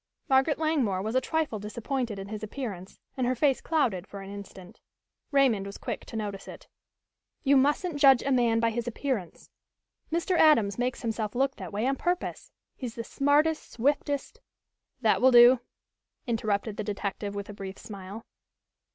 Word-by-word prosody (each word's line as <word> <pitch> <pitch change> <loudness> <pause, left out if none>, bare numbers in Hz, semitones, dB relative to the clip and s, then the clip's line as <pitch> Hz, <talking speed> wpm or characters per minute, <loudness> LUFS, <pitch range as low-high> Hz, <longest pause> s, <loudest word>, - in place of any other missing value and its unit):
Margaret 270 +3 +3
Langmore 270 -13 0
was 220 +2 -3
a 260 - +3
trifle 315 -9 -1
disappointed 235 +2 -3
in 195 0 -7
his 215 -1 -5
appearance 210 -5 -6 0.2
and 255 -2 0
her 255 - +1
face 270 +1 +2
clouded 230 - 0
for 200 - -8
an 195 0 -9
instant. 195 -2 -11 0.5
Raymond 255 -8 +3
was 200 - -8
quick - - -5
to - - -10
notice 205 -3 -4
it. - - -11 0.8
"You 280 -1 +4
mustn't 290 +4 +2
judge 270 -3 +6
a 275 - -1
man 235 -3 +3
by 230 0 +2
his 240 +1 -3
appearance. 240 -6 -4 0.6
Mr. 340 +3 0
Adams 230 - +4
makes 250 0 -2
himself 220 -2 -2
look 270 +2 +1
that - - -7
way 210 +3 -1
on 270 +1 +1
purpose. 355 0 -2 0.2
He's 245 -4 -6
the 230 - -4
smartest, 290 +5 +1
swiftest 285 +2 -1 0.3
" - - -52
"That - - +3
will 260 - +7
do," 245 0 +8 0.7
interrupted 215 -2 -1
the 215 - -2
detective 205 0 -4
with 200 0 -5
a 205 - -8
brief 195 -1 -7
smile. 200 +1 -9
235 Hz, 170 wpm, -28 LUFS, 205-275 Hz, 0.8 s, do